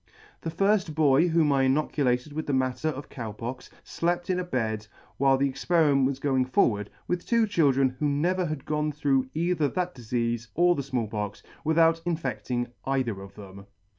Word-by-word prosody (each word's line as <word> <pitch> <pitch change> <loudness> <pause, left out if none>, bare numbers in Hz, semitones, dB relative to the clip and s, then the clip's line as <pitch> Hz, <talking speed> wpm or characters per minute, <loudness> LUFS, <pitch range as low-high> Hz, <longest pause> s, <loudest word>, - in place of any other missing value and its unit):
The 165 - -3
firft 195 -1 +1
boy 155 +1 +4
whom 160 -3 +3
I 135 -1 +3
inocu 145 +2 +1
lated 125 +3 0
with 155 +1 -4
the 145 - 0
matter 130 +3 0
of 145 -2 -3
Cow 115 -5 -6
Pox, 120 +4 -7
flept 175 +2 -1
in 180 - 0
a - - -1
bed, 110 -9 -2 0.3
while 135 0 +4
the 140 +1 +2
experiment 140 0 +2
was 135 -1 -2
going 135 -2 +1
forward, 105 -5 +1 0.2
with 180 0 -1
two 230 -1 +2
children 135 -9 +2
who 150 - +1
never 175 +6 +1
had 150 -3 -5
gone 150 0 -1
through 140 -3 +1
either 170 -2 +1
that 180 +4 -2
difeafe 120 -1 -2
or 175 +1 +4
the 145 - -2
Small 130 -4 -2
Pox, 105 -1 -5 0.2
without 165 +1 +3
infedling 125 -7 -2
either 130 -7 -1
of 100 0 -12
them. 100 -1 -11
140 Hz, 185 wpm, -27 LUFS, 125-165 Hz, 0.3 s, boy